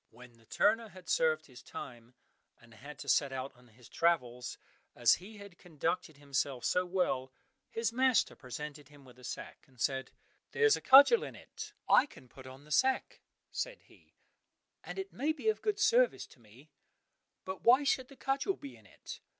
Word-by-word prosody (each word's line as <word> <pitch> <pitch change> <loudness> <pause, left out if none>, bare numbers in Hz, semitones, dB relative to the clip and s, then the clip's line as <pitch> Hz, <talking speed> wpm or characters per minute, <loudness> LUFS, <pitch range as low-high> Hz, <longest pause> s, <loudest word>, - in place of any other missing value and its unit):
When 125 +1 -15
the 115 -1 -24
turner 225 +2 +2
had 185 -2 -15
served 480 -1 +2
his - - -14
time, 120 0 -10 0.4
and 120 -1 -19
had 140 +7 -11
to - - -10
set 140 -2 +3
out 130 +1 -5
on 125 0 -21
his 120 +1 -18
travels, 125 -8 0 0.4
as 120 -2 +5
he 210 +3 -11
had 200 -3 -13
conducted 165 -1 -3
himself 140 -2 -2
so 180 0 +1
well, 175 -8 -1 0.4
his 230 0 -2
master 255 0 +2
presented 145 +2 -8
him 145 -2 -17
with 125 -1 -17
a - - -16
sack - - -7
and 130 -2 -25
said, 130 +1 -1 0.4
"There 460 - 0
is 435 -1 +6
a - - -6
cudgel 280 - +8
in - - -7
it." - - -10
"I 285 - +6
can 130 - -16
put 130 +1 -13
on 130 +2 -12
the 150 - -17
sack," 260 - +1 0.3
said - - -4
he, - - -24 0.7
"and - - -8
it 385 0 -5
may 295 +5 0
be 320 +8 -1
of 435 - -1
good 420 -1 -1
service 470 +4 +3
to - - -19
me, 120 +7 -19 0.7
but 190 -2 -6
why 255 +4 +6
should 260 -2 +1
the 275 - -15
cudgel 275 +9 -1
be 135 -3 -10
in 110 -3 -19
it? - - -10
150 Hz, 190 wpm, -32 LUFS, -, 0.7 s, cudgel